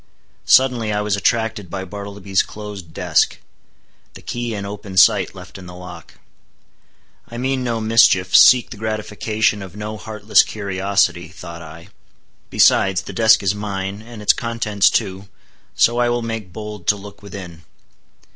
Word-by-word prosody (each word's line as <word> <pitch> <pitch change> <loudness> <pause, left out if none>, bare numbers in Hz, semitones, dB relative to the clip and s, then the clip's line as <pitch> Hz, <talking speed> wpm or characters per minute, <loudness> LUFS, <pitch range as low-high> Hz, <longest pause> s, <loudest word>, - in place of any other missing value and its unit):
Suddenly 125 -4 +4
I 105 0 -1
was 105 -1 0
attracted 110 -2 -1
by 95 +1 -5
Bartleby's 100 0 -2
closed 105 -5 -9
desk, - - +1 0.8
the - - -12
key 120 -2 -4
in 100 -1 -5
open 100 -1 -8
sight 90 - +4
left - - -11
in 90 - -11
the 90 - -10
lock. 90 -1 -11 1.1
I 120 - -8
mean 130 +1 -1
no 120 -2 -2
mischief, 110 -5 +3
seek 125 -1 +7
the 110 - -8
gratification 110 0 -1
of 95 -1 -10
no 105 +1 -6
heartless 105 -1 +2
curiosity, 100 -3 -1
thought 85 -1 -10
I; 80 +3 -12 0.6
besides, 95 -3 +3
the - - -8
desk 110 -1 +4
is 95 0 +1
mine, 100 -1 -5
and 115 -1 -11
its - - +5
contents 115 -4 +1
too, 100 -2 -2 0.5
so 120 +1 +3
I 120 0 +2
will 120 0 -1
make 115 -5 -5
bold 105 -2 -8
to 105 - +4
look 100 0 -12
within. 90 -4 -10
105 Hz, 155 wpm, -19 LUFS, 95-110 Hz, 1.1 s, seek